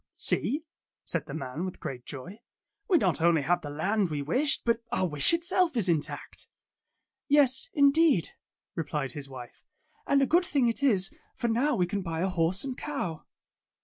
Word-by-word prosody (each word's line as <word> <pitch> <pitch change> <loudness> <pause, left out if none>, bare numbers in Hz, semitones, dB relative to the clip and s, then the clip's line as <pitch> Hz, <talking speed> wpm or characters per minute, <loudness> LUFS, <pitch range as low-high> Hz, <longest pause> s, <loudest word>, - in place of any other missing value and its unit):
''See,'^ 295 +5 -1 0.4
said - - -3
the - - -7
man 140 +2 -4
with 185 -1 -5
great 125 -2 -6
joy, 165 - -8 0.5
''we 360 - +6
not 180 - +1
only 165 -3 +4
have 175 +5 +1
the 145 - -6
land 190 +6 0
we 145 -2 -2
wished, 270 - 0
but 230 0 +2
our 185 - +1
wish 150 -4 +3
itself 335 -2 +2
is 205 -5 +2
intact." 160 -4 -2 0.8
"Yes, 275 -3 +3
indeed," 285 - +4 0.4
replied 150 -4 -3
his 140 0 -7
wife, 125 -2 -11 0.4
"and 280 - +4
a 275 - +4
good 345 +7 +3
thing 280 -8 +1
it 230 +3 0
is, 195 -9 +2 0.2
for 235 - -1
now 255 +5 +2
we 180 - +2
can 200 +3 -3
buy 165 -3 -3
a 190 - +1
horse 180 +1 0
and 265 -2 -4
cow." 180 - -4
190 Hz, 180 wpm, -28 LUFS, -, 0.8 s, we